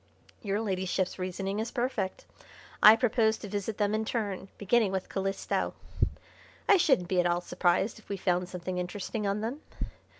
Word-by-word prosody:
"Your 205 -2 -1
Ladyship's 190 -2 -1
reasoning 195 +2 -2
is 225 - -2
perfect. 240 -6 -2 0.6
I 215 +1 +10
propose 220 -1 +2
to - - -8
visit 205 +1 -3
them 205 -1 +1
in 215 0 +1
turn, 205 -4 -2
beginning 210 0 +2
with 190 -1 -3
Calisto. 195 0 -1 0.9
I 405 - +7
shouldn't 270 - +3
be 185 0 +1
at 175 - +4
all 175 0 +1
surprised 180 +5 +1
if - - -22
we 200 - -2
found 180 -1 0
something 180 0 -4
interesting 200 +4 -3
on 200 +1 0
them. 245 +7 -3
200 Hz, 165 wpm, -29 LUFS, 185-220 Hz, 0.9 s, I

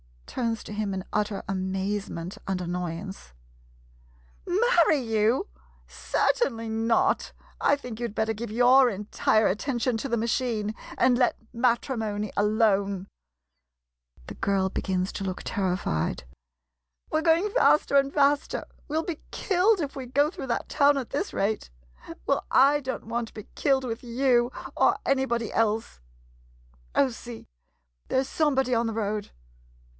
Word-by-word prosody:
[Turns 230 -3 -2
to - - -9
him 210 -2 -2
in 190 -1 -3
utter 210 -1 -1
amazement 190 -1 -3
and 190 -1 -1
annoyance.] 175 - -5 1.1
Marry 360 -5 +4
you? 225 - +1 0.4
Certainly 230 - 0
not! 225 +1 +1 0.3
I 285 - +4
think 250 -5 -8
you 240 - -1
'd 215 - -12
better 220 0 0
give 225 +2 -6
your 250 +3 +5
entire 210 +1 +1
attention 240 +3 0
to 270 +5 -4
the 235 - +1
ma 225 - -1
chine 225 -3 -1 0.2
and 250 -1 +4
let 245 -1 +3 0.2
matrimony 230 -4 0
alone. 200 -2 +2 1.2
[The - - -7
girl 195 -1 +1
begins 185 -1 -1
to 195 - -5
look 185 -1 -4
terrified.] 180 - -1 0.9
We 310 - +2
're - - -4
going 340 +5 +3
faster 300 - +4
and 275 0 +3
faster. 285 0 +2 0.2
We 305 - -4
'11 330 +2 -1
be - - -29
killed 385 +1 +2
if 285 -2 -4
we 265 - -5
go 285 +5 +2
through 270 - -7
that 235 - -2
town 285 -1 +4
at 260 -4 -4
this 325 +8 -2
rate! 210 +2 -1 0.6
Well, - - 0 0.2
/ 290 +2 +4
don't 260 -1 -5
want 235 +1 -2
to - - -16
be 215 - -9
killed 270 -2 +2
with 230 -2 -4
you 245 0 +2 0.3
or - - +4
anybody 250 -4 0
else! 220 - 0 1.0
Oh, 275 - +4
see 235 -1 -9 0.3
— - - -45
there 260 - +1
's 270 - -10
somebody 270 -5 +1
on 230 0 +2
the 225 - -2
road! 210 -1 -2
230 Hz, 150 wpm, -26 LUFS, 205-270 Hz, 1.2 s, your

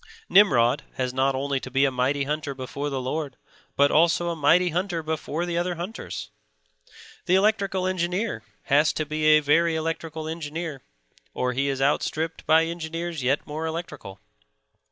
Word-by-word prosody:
Nimrod 140 - +5
has 125 -1 -2
not 135 +1 +1
only 135 0 -1
to 130 - -8
be 135 +2 +3
a 135 - +1
mighty 130 +3 0
hunter 145 0 -3
before 140 +2 -4
the 135 -2 -2
Lord, 135 +2 -4 0.4
but 140 0 +4
also 170 +2 +3
a - - -3
mighty 170 +4 +4
hunter 175 0 -2
before 160 +1 -3
the 170 -1 -1
other 175 0 -1
hunters. 180 +7 -6 1.0
The 180 - +4
electrical 195 -2 +1
engineer 185 +4 -1 0.2
has 150 +1 +3
to 155 - -2
be 155 +1 -2
a 155 0 +6
very 165 +3 +3
electrical 160 0 -3
engineer, 160 -2 -5 0.5
or 125 0 0
he 135 +2 0
is 135 -1 -1
outstripped 155 +3 -1
by 160 +1 +5
engineers 165 -1 -4
yet 130 +3 0
more 155 +2 -4
electrical. 160 - -6
155 Hz, 160 wpm, -25 LUFS, 140-170 Hz, 1.0 s, a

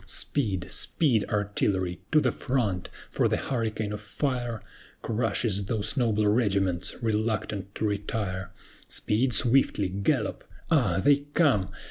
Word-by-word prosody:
Speed, 100 -9 -1
speed, 120 -10 +2
Artillery! 100 -3 0
to 155 - +6
the - - +2
front! 110 -9 -1 0.2
for - - +2
the - - +1
hurricane 110 -4 -2
of 105 - -5
fire 120 0 -2 0.4
Crushes 110 -3 0
those 105 0 -2
noble 110 -5 +2
regiments, 100 -5 +1
reluctant 105 -3 -1
to - - -1
retire! 100 -3 -2 0.4
Speed 120 +5 +1
swiftly! 115 -4 +3
Gallop! 100 +1 -1 0.3
Ah! 120 - +3
they 145 -1 +6 0.2
come! 115 - +3
105 Hz, 120 wpm, -27 LUFS, 100-120 Hz, 0.4 s, to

